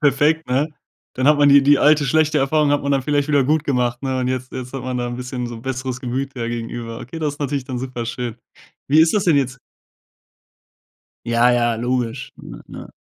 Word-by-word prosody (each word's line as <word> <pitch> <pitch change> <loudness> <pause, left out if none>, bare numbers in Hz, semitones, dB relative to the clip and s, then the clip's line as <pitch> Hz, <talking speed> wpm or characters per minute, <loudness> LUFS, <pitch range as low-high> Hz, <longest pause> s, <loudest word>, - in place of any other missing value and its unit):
Perfekt, 150 +2 +2
ne? 135 +5 +1 0.5
Dann 130 +3 +2
hat 150 - +6
man 145 -1 +5
die 140 0 +7
die 145 0 +5
alte, 150 0 +4
schlechte 155 +2 +2
Erfahrung 145 +2 +2
hat 145 - +1
man 140 - -2
dann 135 -2 +1
vielleicht 145 +1 0
wieder 140 -3 +3
gut 155 +2 +2
gemacht, 125 -2 -1
ne? 130 -1 -1
Und 125 - -1
jetzt 130 0 -4
jetzt 125 0 -6
hat 135 - -5
man 130 0 -3
da 120 - -2
'n 120 0 -5
bisschen 125 -1 -5
so 120 - -7
'n 115 - -12
besseres 130 -1 -4
Gemüt 130 +2 -3
ja 115 -2 -3
gegenüber. 115 0 -5
Okay, 160 +7 -8
das 150 -2 -2
ist 150 - -21
natürlich 140 -1 -2
dann 130 -2 -5
super 125 -2 -5
schön. 120 -1 -4 0.5
Wie 150 +3 +5
ist 160 0 +4
das 210 - +1
denn 165 -5 +4
jetzt 135 -1 -1 1.7
Ja, 120 +1 +3
ja, 120 -1 +2
logisch, 120 +1 -2
ne, - - -11
ne? - - -10
130 Hz, 225 wpm, -20 LUFS, 125-145 Hz, 1.7 s, die